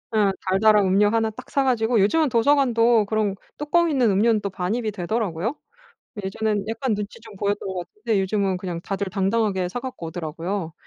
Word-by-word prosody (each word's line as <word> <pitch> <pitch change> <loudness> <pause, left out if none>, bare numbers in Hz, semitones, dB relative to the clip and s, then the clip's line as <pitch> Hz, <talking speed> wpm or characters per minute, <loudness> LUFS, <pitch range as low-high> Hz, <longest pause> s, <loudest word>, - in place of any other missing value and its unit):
예. 205 -2 +4 0.2
달달한 205 +2 +4
음료 195 +2 +4
1 225 0 +1
딱 215 - -12
사 275 - +1
가지고 235 -3 +2
요즘은 295 +10 +3
도서관도 235 -3 +3
그런 215 -2 0 0.2
뚜껑 335 +3 +2
있는 260 -6 +2
음료는 215 +2 +3
또 200 - -3
반입이 210 +5 -2
되더라고요. 205 - -2 0.7
예전에는 205 +1 -1
약간 235 +1 -1
눈치 205 0 -6
좀 220 -2 -13
보였던 205 0 -1
것 190 - -4
같은데 215 -1 -1
요즘은 195 -1 0
그냥 180 -2 -5
다들 195 +2 -3
당당하게 195 -1 0
사 245 - -4
갖고 255 -9 -6
오더라고요. 165 +2 -4
210 Hz, 390 characters per minute, -23 LUFS, 190-230 Hz, 0.7 s, 예